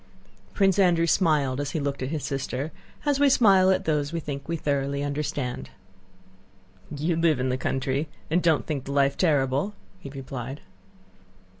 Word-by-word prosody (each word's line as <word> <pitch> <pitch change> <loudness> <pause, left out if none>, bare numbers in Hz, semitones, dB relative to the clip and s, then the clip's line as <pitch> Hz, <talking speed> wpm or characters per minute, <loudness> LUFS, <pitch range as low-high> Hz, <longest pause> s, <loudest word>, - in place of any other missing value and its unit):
Prince 195 -1 +3
Andrew 175 -3 +4
smiled 150 -6 +2
as 145 - -3
he - - 0
looked 140 -1 -3
at 130 - -2
his 155 -1 -3
sister, 135 +2 -3 0.3
as 290 -2 +2
we 285 -1 +5
smile 195 -7 +5
at 190 - +2
those 150 -2 0
we 170 - -2
think 140 -3 -6
we 170 - 0
thoroughly 140 -1 -1
understand. 145 -3 -3 1.2
"You 155 +4 -1
live 165 -3 +2
in 130 +1 0
the 125 - +1
country 135 +3 -1 0.2
and 170 +3 +1
don't 165 -4 +2
think 145 -4 -3
the 140 - -4
life 140 0 +3
terrible," 145 +3 +1 0.2
he 140 - -9
replied. 135 0 -7
145 Hz, 165 wpm, -26 LUFS, 135-170 Hz, 1.2 s, we